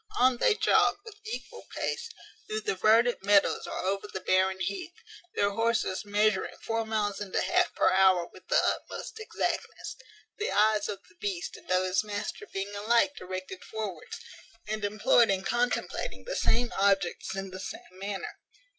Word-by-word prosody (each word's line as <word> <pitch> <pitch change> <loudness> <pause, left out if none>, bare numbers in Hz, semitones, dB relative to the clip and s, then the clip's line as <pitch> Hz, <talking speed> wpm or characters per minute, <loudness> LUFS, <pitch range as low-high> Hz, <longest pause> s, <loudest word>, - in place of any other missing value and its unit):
On 255 0 +5
they 440 - +4
jog, - - +4
with 425 -2 -11
equal 450 - -7
pace, 465 - -2 0.4
through 215 0 -2
the 210 - -1
verdant 225 +5 +4
meadows 200 0 +3
or - - -4
over 195 +2 -1
the 190 - -5
barren 190 0 +2
heath, 360 - -3 0.4
their 200 0 +2
horses 225 -3 0
measuring 205 -1 +1
four 225 -1 -2
miles 210 -2 -1
and 200 -2 -5
a - - +3
half - - +2
per - - +4
hour 185 -2 +5
with - - -16
the - - +1
utmost 445 - -1
exactness; 435 - -3 0.4
the 425 - -1
eyes 210 0 +3
of 200 -1 -5
the - - -22
beast 185 -4 -3
and - - -15
of 185 0 +3
his 185 +2 +1
master 210 - -5
being 195 +1 -4
alike 230 +7 +2
directed 185 0 -6
forwards, 210 -7 -6 0.5
and 215 0 -3
employed 215 +3 +4
in 190 -1 +1
contemplating 245 - -1
the - - -4
same 240 +1 +2
objects 195 -2 +1
in 195 -1 -4
the 185 - -7
same - - -7
manner. 200 0 -5
205 Hz, 170 wpm, -29 LUFS, 190-230 Hz, 0.5 s, On